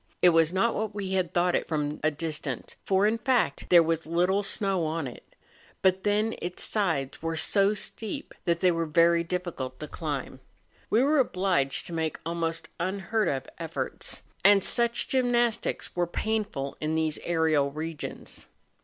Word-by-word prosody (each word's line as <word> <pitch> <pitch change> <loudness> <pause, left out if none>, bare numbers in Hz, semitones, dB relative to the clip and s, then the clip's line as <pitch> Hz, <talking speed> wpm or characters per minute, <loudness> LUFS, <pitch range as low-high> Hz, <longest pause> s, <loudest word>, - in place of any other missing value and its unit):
It 180 - +9
was 165 -1 +4
not 210 +5 +2
what 215 -1 -3
we 195 -2 -3
had 185 -2 0
thought 175 0 +2
it - - 0
from 150 -2 -2
a 155 - +3
distance, 150 -4 -5
for, 195 +1 +3
in 220 +2 +2
fact, 245 0 +1
there 170 -1 +8
was 165 -1 -1
little 180 +4 +2
snow 195 -2 0
on 160 -1 -2
it; 125 - -10 0.5
but 190 0 +3
then 210 +2 +1
its 175 +1 -4
sides 165 -11 -1
were 165 0 -2
so 200 +5 +3
steep 215 0 -5
that 170 -2 +1
they 185 -1 +5
were 165 -1 -1
very 170 +2 +4
diffi¬ 180 0 -3
cult 130 -1 -6
to 150 - -6
climb. 145 -5 -4 0.5
We 230 +4 +4
were 295 +2 +3
obliged 180 - +1
to 170 - -7
make 160 -1 -1
almost 165 0 -2
unheard 195 +4 -1
of 135 -2 -2
efforts, - - -4 0.2
and 200 0 +6
such 235 +2 +1
gymnastics 240 -3 +1
are 175 -1 +1
painful 205 -8 -2
in 155 +1 -1
these 160 -1 0
aerial 160 -4 +2
regions. 155 +1 -6
175 Hz, 170 wpm, -27 LUFS, 160-205 Hz, 0.5 s, It